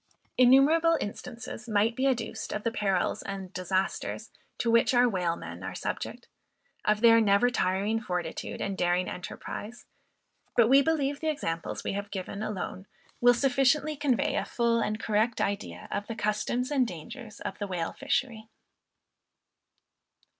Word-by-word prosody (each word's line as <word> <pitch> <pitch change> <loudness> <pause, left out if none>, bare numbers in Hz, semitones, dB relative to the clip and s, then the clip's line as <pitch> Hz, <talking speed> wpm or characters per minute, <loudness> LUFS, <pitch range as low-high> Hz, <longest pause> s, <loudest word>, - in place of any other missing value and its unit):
Innumerable 295 +7 +5
instances 235 +2 -7
might 215 +2 +2
be 265 +1 +1
adduced 230 -4 -2
of 210 - -3
the 230 - 0
perils 195 -5 0
and 195 -1 -6
disasters 185 +1 -2 0.3
to 230 - +1
which 230 +2 +4
our 245 +1 +6
whalemen 170 - -2
are 95 0 -5
subject; - - -5 0.6
of 210 0 +2
their 230 -1 +7
never 210 +4 +4
tiring 205 +1 0
fortitude 180 -5 -4
and 195 - -2
daring 180 0 +1
enterprise; 210 +5 -7 0.7
but 235 -2 +6
we 270 +3 +7
believe 285 -2 0
the 315 - -1
examples 165 - -3
we - - -2
have 200 0 -4
given 200 +1 -5
alone 190 -2 -4 0.3
will 245 0 +6
sufficiently 275 +4 +2
convey 280 -4 +1
a - - +1
full 235 -1 +1
and 215 -1 -1
correct 220 +2 +1
idea 200 +1 -3
of 205 - -3
the 230 - -4
customs 215 +5 -1
and 265 -4 +3
dangers 215 - -9
of - - -6
the 205 - -3
whale 175 -3 -3
fishery. 235 -5 -2
225 Hz, 145 wpm, -28 LUFS, 195-250 Hz, 0.7 s, their